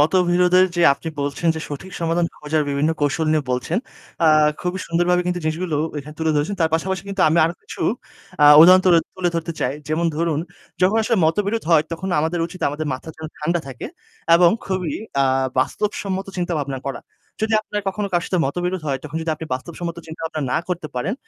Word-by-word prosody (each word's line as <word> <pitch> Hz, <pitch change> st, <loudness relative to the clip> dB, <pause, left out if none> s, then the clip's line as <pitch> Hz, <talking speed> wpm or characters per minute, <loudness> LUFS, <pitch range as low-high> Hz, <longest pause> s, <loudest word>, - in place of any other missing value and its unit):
মতবিরোধের 180 Hz, +3 st, +4 dB
যে 175 Hz, -, +2 dB
আপনি 160 Hz, -, -7 dB
বলছেন 145 Hz, +4 st, -1 dB
যে, -, -, -4 dB
সঠিক 150 Hz, +6 st, -7 dB
সমাধান 170 Hz, +1 st, +1 dB
খোঁজার 150 Hz, +1 st, -1 dB
বিভিন্ন 140 Hz, +3 st, +1 dB
কৌশল 145 Hz, +2 st, 0 dB
নিয়ে 155 Hz, -2 st, +1 dB
বলছেন। 125 Hz, -, -1 dB, 0.5 s
আ -, -, +6 dB, 0.3 s
খুবই 180 Hz, +1 st, -2 dB
সুন্দরভাবে 175 Hz, +1 st, +2 dB
কিন্তু 180 Hz, 0 st, -1 dB
জিনিসগুলো 160 Hz, 0 st, -1 dB, 0.2 s
এখানে 150 Hz, +1 st, -9 dB
তুলে 160 Hz, -1 st, +1 dB
ধরেছেন। 160 Hz, +8 st, -1 dB
তার 160 Hz, -1 st, +3 dB
পাশাপাশি 185 Hz, +2 st, -1 dB
কিন্তু 195 Hz, -1 st, -3 dB
আমি 165 Hz, +2 st, +2 dB
আরও 165 Hz, +2 st, -1 dB
কিছু -, -, -7 dB, 0.6 s
আ -, -, +8 dB, 0.2 s
উদাহরণ 185 Hz, +3 st, +9 dB
তুল 180 Hz, -, +6 dB, 0.2 s
তুলে 180 Hz, -2 st, 0 dB
ধরতে 165 Hz, 0 st, -3 dB
চাই। -, -, 0 dB, 0.2 s
যেমন 160 Hz, +2 st, 0 dB
ধরুন, 165 Hz, -2 st, 0 dB, 0.4 s
যখন 190 Hz, +4 st, +4 dB
আসলে 230 Hz, +1 st, +1 dB
মতবিরোধ 205 Hz, +7 st, 0 dB
হয় 160 Hz, -2 st, +6 dB
তখন 175 Hz, +3 st, -4 dB
আমাদের 165 Hz, +2 st, -1 dB
উচিত 180 Hz, +2 st, -12 dB
আমাদের 150 Hz, +2 st, -4 dB
মাথা 130 Hz, -, -9 dB
যেন 160 Hz, -, -7 dB
ঠান্ডা 170 Hz, +3 st, 0 dB
থাকে 130 Hz, -2 st, -7 dB, 0.5 s
এবং 170 Hz, 0 st, +6 dB, 0.2 s
খুবই 185 Hz, -6 st, -2 dB, 0.3 s
আ -, -, +4 dB, 0.3 s
বাস্তবসম্মত 195 Hz, +6 st, -1 dB
চিন্তাভাবনা 150 Hz, -7 st, -2 dB
করা। 135 Hz, -, -5 dB, 0.4 s
যদি 220 Hz, 0 st, 0 dB
আপনার 210 Hz, -1 st, -4 dB
কখনো 200 Hz, +1 st, -3 dB
কারো 175 Hz, 0 st, +1 dB
সাথে 185 Hz, -, 0 dB
মতবিরোধ 175 Hz, +4 st, -2 dB
হয় 135 Hz, -2 st, -1 dB
তখন 155 Hz, +1 st, -6 dB
যদি 160 Hz, -, -2 dB
আপনি 160 Hz, -, -8 dB
বাস্তবসম্মত 170 Hz, +5 st, -6 dB
চিন্তাভাবনা 160 Hz, 0 st, -5 dB
না -, -, +2 dB
করতে 175 Hz, -3 st, -3 dB
পারেন। 150 Hz, -, -1 dB
170 Hz, 190 wpm, -21 LUFS, 155-180 Hz, 0.6 s, উদাহরণ